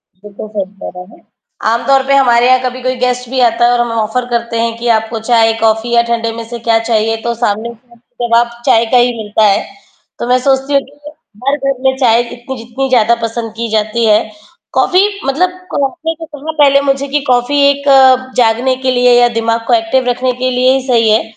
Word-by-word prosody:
बिल्कुल, 205 +2 -11
सही 205 -3 -3 0.2
कह - - -6
रहे 180 +4 -11
है। - - -24 0.5
आमतौर 265 +3 +1
पे 275 - +2
हमारे 245 -2 +3
यहाँ 255 0 +4
कभी 255 0 -4
कोई 255 0 -1
गेस्ट 250 -1 -1
भी 260 0 -2
आता 240 0 +2
है, 240 - +3
और 245 - +1
हम 240 -1 -2
ऑफर 225 +3 -2
करते 235 -1 -2
हैं, 230 0 -2
कि 240 +1 -5
आपको 225 +1 -5
चाय, 225 -1 +4
कॉफी 220 +1 +1
या 235 - +5
ठंडे 230 -1 -1
में 230 0 -7
से 240 -1 -6
क्या 225 0 +4
चाहिए? 225 -1 0
तो 235 0 -2
सामने 225 0 -2
से 235 +3 -25
हमें 240 0 -8
जवाब 235 +1 +2 0.2
चाय 230 +1 +3
का - - +6
ही 245 0 +3
मिलता 215 0 -1
है। 195 - +1 0.5
तो 240 - -4
मैं 250 +1 +3
सोचती 270 +1 +1
हूँ, 275 - +3
कि 290 +2 -14 0.4
हर 285 - +2
घर 275 -1 -2
में 265 0 +2
चाय 235 -3 +3
इतनी 240 +2 -8
जितनी 240 +4 -4
ज़्यादा 235 -2 +3
पसंद 230 0 -4
की 230 -1 -3
जाती 220 +2 0
है, 210 -1 +4 0.5
कॉफी 370 +1 +2 0.2
मतलब 320 +7 +1 0.3
आपने 325 +3 -3
जो 325 - -7
कहा 300 0 -7
पहले 280 0 +5
मुझे 275 0 -1
कि 290 +2 0
कॉफी 250 +3 +1
एक 280 0 -1 0.5
जागने 245 +2 +2
के 260 - +1
लिए 250 0 +3
या 240 - +5
दिमाग 230 0 0
को 245 - +2
एक्टिव 235 +3 +1
रखने 250 +1 -1
के 255 - +1
लिए 255 +1 +2
ही 270 - 0
सही 230 -3 +2
है। 215 +1 +3
240 Hz, 220 wpm, -13 LUFS, 230-265 Hz, 0.5 s, का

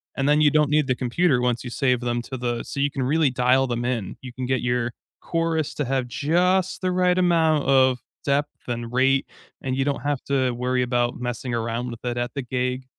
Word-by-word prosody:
and 135 +1 0
then 150 +1 +4
you 150 - +6
don't 150 -1 +3
need 150 -2 +3
the 130 - +1
computer 130 +1 +1
once 125 -1 0
you 125 - -6
save 125 -1 +1
them 120 0 -1
to 130 - -6
the 120 -1 -2
so 140 - -6
you 140 +1 +2
can 135 - -2
really 150 +2 +2
dial 130 +2 +3
them 120 0 -2
in, 115 -6 -2
you 130 -1 -8
can 130 0 -4
get 130 0 0
your 120 -1 0 0.3
chorus 165 -2 -1
to 145 - -1
have 130 -1 -1
just 180 +9 +1
the 185 0 0
right 180 0 +2
amount 160 -4 +3
of 130 -2 +4 0.3
depth 145 0 -1
and 120 -1 -4
rate, 135 +2 +2 0.3
and 130 -1 -2
you 135 0 0
don't 140 -3 -1
have 145 -1 -2
to 135 -2 +1
worry 125 +1 0
about 120 -1 0
messing 125 0 -4
around 115 +1 -2
with 115 - -10
it 120 0 -2
at 120 +1 -2
the 140 - -3
gig. 125 +1 -2
130 Hz, 225 wpm, -24 LUFS, 125-145 Hz, 0.3 s, you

